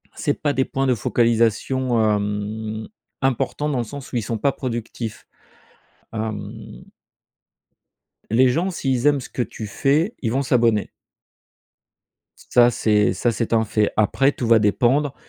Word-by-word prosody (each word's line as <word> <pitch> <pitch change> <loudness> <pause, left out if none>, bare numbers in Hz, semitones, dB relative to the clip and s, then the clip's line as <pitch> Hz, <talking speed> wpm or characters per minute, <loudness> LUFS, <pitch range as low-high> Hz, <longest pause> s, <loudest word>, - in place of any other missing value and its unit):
c'est 145 - 0
pas 145 -1 +1
des 130 -1 +1
points 135 0 -1
de 125 - +3
focalisation, 115 +2 +1
hem, 105 +1 -2 0.3
importants, 135 +3 0
dans 140 - -1
le - - 0
sens 140 +4 -9
où, - - -6
ils 120 - +1
sont 110 +1 -3
pas 140 +6 +1
productifs. 120 -4 -5 0.9
Hem 110 - -6 1.5
Les 125 +2 +5
gens 170 +9 0
s'ils 135 -7 0
aiment 145 -2 +3
ce - - -10
que - - -3
tu 115 -2 -5
fais, 145 - +1
ils 115 -3 -1
vont 135 +2 0
s'abonner. 115 -5 +2 1.5
Ça 120 0 +3
c'est 105 -3 +2
ça 120 +5 0
c'est 115 0 -2
un 110 -1 +3
fait. 105 0 +1
Après, 135 +6 +3
tout 120 - -4
va 115 -1 +6
dépendre 125 +7 +2
120 Hz, 150 wpm, -22 LUFS, 110-135 Hz, 1.5 s, va